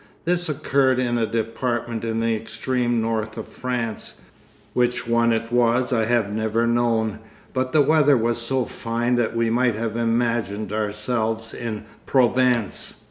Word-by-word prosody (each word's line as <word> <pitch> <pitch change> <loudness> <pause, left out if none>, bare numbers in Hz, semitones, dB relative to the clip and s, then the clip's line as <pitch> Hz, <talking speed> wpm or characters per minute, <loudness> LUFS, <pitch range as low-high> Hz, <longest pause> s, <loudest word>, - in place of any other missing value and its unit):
This 175 0 0
occurred 135 -3 +2
in 120 -2 0
a 110 - +1
department 115 +1 -2
in 115 0 -1
the 115 0 +1
extreme 120 +2 -1
north 110 -1 -2
of - - -6
France, 120 -3 -4 0.5
which 125 -1 0
one 115 0 +3
it 115 0 -1
was 120 +1 +2
I 115 -2 +2
have 115 -3 +1
never 110 +1 0
known, 115 -2 +1 0.3
but 130 0 -1
the 150 0 +5
weather 145 -1 +4
was 115 +1 0
so 125 +1 0
fine 120 +1 -2
that 115 -1 0
we 115 -1 +1
might 120 -1 +2
have 110 0 -3
imagined 115 -3 0
ourselves 110 +1 -2
in 110 -3 -5 0.2
Provence. 125 -3 +2
115 Hz, 150 wpm, -23 LUFS, 110-125 Hz, 0.5 s, the